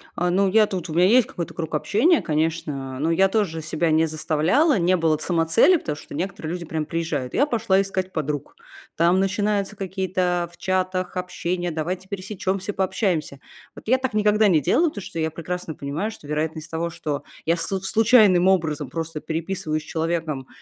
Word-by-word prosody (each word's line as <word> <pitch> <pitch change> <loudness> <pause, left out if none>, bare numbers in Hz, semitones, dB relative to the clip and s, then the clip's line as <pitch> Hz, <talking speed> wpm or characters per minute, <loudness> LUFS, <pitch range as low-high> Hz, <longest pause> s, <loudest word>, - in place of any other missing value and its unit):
А, 180 +1 0
ну 195 +2 +3
я 215 +2 +4
тут, 180 -3 -4
у 155 - -4
меня 175 +2 +4
есть 240 +4 +5
какой-то 170 - -6
круг 160 -1 -5
общения, 235 - +3
конечно, 150 -4 -2
но 160 - 0
я 190 +4 +4
тоже 190 -7 0
себя 160 +1 0
не 160 +1 +3
заставляла, 160 - +2
не 180 0 +3
было 160 -3 +2
самоцели, 165 - +3
потому 150 - -4
что - - -12
некоторые 165 0 -4
люди 175 -1 -5
прям 160 -1 -3
приезжают, 160 -6 -3
и: - - -2
"Я 285 - +4
пошла 220 -7 +2
искать 190 -1 -3
подруг". 150 -2 -3 0.4
Там 170 +3 +3
начинаются 200 +1 0
какие-то 185 -2 -1
в - - -18
чатах 185 -1 -1
общения: 180 -1 -2
"Давайте 180 +4 -3
пересечемся, 195 0 -3
пообщаемся". 185 -7 -1 0.4
Вот - - -13
я 255 - +4
так 260 -2 -3
никогда 210 0 +3
не 170 -5 +4
делала, 330 - +3
потому 205 - -8
что 165 - -8
я 160 0 0
прекрасно 170 0 -5
понимаю, 150 +12 -3
что 150 - -13
вероятность 155 +2 -3
того, 165 +1 -2
что 150 -3 -4 0.2
я 165 - +4
слу 190 +3 -2
случайным 210 -3 +5
образом 165 -6 +1
просто 165 -1 -4
переписываюсь 160 -1 -3
с - - -15
человеком, 160 -5 -2
175 Hz, 185 wpm, -23 LUFS, 160-195 Hz, 0.4 s, есть